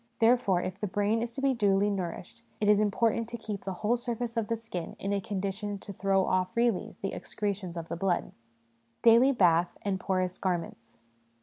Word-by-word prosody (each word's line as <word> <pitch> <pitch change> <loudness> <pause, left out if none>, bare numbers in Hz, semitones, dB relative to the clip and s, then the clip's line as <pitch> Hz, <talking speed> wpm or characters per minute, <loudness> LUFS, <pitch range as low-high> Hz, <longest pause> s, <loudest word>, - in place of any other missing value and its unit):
Therefore, 225 -6 +3
if 185 +1 -5
the 210 - -2
brain 205 +3 +1
is 235 0 -3
to 270 - -5
be 275 -1 +4
duly 205 -3 +2
nourished, 180 -2 -5 0.2
it 210 - +1
is 210 0 +6
important 225 +2 +1
to 235 - -5
keep 215 -3 -6
the 190 - -2
whole 240 +3 +3
surface 240 -1 -4
of 225 -2 0
the 230 - 0
skin 220 -7 -6
in 200 +1 -2
a 200 - 0
condition 200 +1 -3
to 200 +1 -9
throw 195 0 +2
off 185 0 0
freely 230 -3 +1
the 195 - -2
excretions 195 -4 -4
of 165 -1 -5
the - - -4
blood. 175 0 0 0.7
Daily 235 +4 +7
Bath 175 -7 +3
and 195 -2 -1
Porous 185 -1 -1
Garments. 165 -11 -3
200 Hz, 195 wpm, -29 LUFS, 185-225 Hz, 0.7 s, Daily